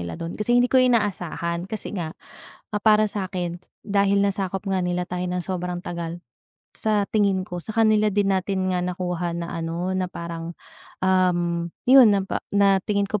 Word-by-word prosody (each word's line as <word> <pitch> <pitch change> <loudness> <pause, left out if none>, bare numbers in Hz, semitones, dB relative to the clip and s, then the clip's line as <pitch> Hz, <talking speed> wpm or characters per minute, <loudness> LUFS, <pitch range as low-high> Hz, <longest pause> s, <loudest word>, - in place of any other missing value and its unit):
nila 85 -1 -6
dun. 165 +1 -5
Kasi 240 +3 +2
hindi 245 - +4
ko 260 - +1
inaasahan 180 -8 0
kasi 215 -1 -5
nga, 165 -4 -3 0.6
ah, 210 - 0
para 215 -1 +5
sakin 185 -4 -3 0.3
dahil 200 0 +2
nasakop 195 -1 -2
nga 190 -1 0
nila 180 0 -1
tayo 180 0 -3
ng 180 - -1
sobrang 180 -1 -3
tagal, 170 0 -5 0.6
sa 210 -2 +1
tingin 200 -3 +2
ko 175 0 -5
sa - - -12
kanila 215 -1 +4
din 200 0 +1
natin 190 0 -1
nga 180 - 0
nakuha 180 -1 -2
na 170 0 -5
ano 170 +3 -2
na 185 -1 -1
parang, 170 -1 -6 0.5
um, 175 -2 +2 0.2
yun 255 -3 +8
na 195 -1 +1
pa - - -2
na 200 -1 +5
tingin 200 -1 +1
ko 210 0 -2
185 Hz, 175 wpm, -24 LUFS, 175-205 Hz, 0.6 s, yun